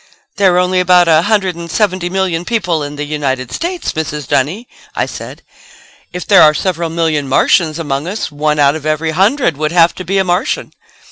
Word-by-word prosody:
"There 190 -3 +3
are - - +2
only 180 0 +2
about 180 -1 +4
a 160 -1 +5
hundred 195 -2 0
and 170 0 -8
seventy 185 -2 0
million 180 -3 -1
people 175 -7 -1
in 145 0 -5
the 145 - -4
United 140 -4 -3
States, 350 +1 -3
Mrs. 150 -3 -4
Dunny," 170 - -1 0.3
I - - 0
said. - - -9 0.7
"If 180 0 -6
there - - +6
are 155 -1 +6
several 170 -2 -2
million 160 -3 -1
Martians 155 +4 +2
among 145 -2 -3
us, 200 -3 -4
one 150 +1 -1
out 145 0 +3
of 155 -1 -5
every 155 +1 -1
hundred 190 - +1
would 155 0 -1
have 170 -1 +4
to 185 - -8
be 190 +3 -1
a 190 - +3
Martian." 180 +1 -2
170 Hz, 200 wpm, -14 LUFS, 150-185 Hz, 0.7 s, there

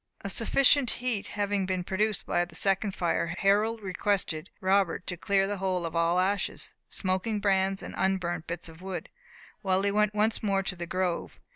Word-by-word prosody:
A 200 - -4
sufficient 260 +4 +4
heat 245 -5 -2
having 205 -2 -1
been 185 -1 -1
produced 210 +3 0
by 175 - +1
the 175 -2 -10
second 195 0 +1
fire, 170 -1 0
Harold 215 +3 +2
requested 185 -4 -1
Robert 190 -2 +2
to 180 - -3
clear 195 +3 +2
the 205 +1 -2
hole 185 -2 -1
of 165 - -5
all 170 +1 +3
ashes, 195 +2 -1 0.2
smoking 190 +3 -1
brands, 195 -1 +1
and - - -7
unburnt 180 -3 0
bits 170 0 -4
of 165 +1 -13
wood, 190 -1 -5 0.5
while 190 -1 +1
he 200 - +2
went 210 0 +2
once 215 +2 +2
more 195 -2 +1
to 190 - -3
the 170 -1 -6
grove. 185 -1 -2
195 Hz, 180 wpm, -28 LUFS, 180-205 Hz, 0.5 s, sufficient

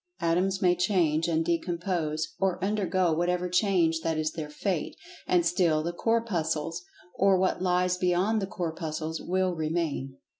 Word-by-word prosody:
Atoms 185 +4 +1
may 180 -1 +4
change, 170 -4 +1
and 165 -1 +1
decompose, 170 -2 -1
or 190 -2 +1
undergo 190 -4 +1
whatever 175 +2 0
change 180 -3 +2
that 160 -1 -1
is 155 0 0
their 155 -2 -6
fate, 170 +2 -2 0.3
and 175 -2 +3
still 170 -3 +2
the 170 +2 -3
Corpuscles, 175 -7 -1 0.3
or 195 0 +3
what 185 0 0
lies 180 0 +1
beyond 185 +5 +1
the 195 - -2
Corpuscles 160 -2 -4
will 185 0 0
remain. 155 -5 -2
175 Hz, 145 wpm, -28 LUFS, 160-185 Hz, 0.3 s, may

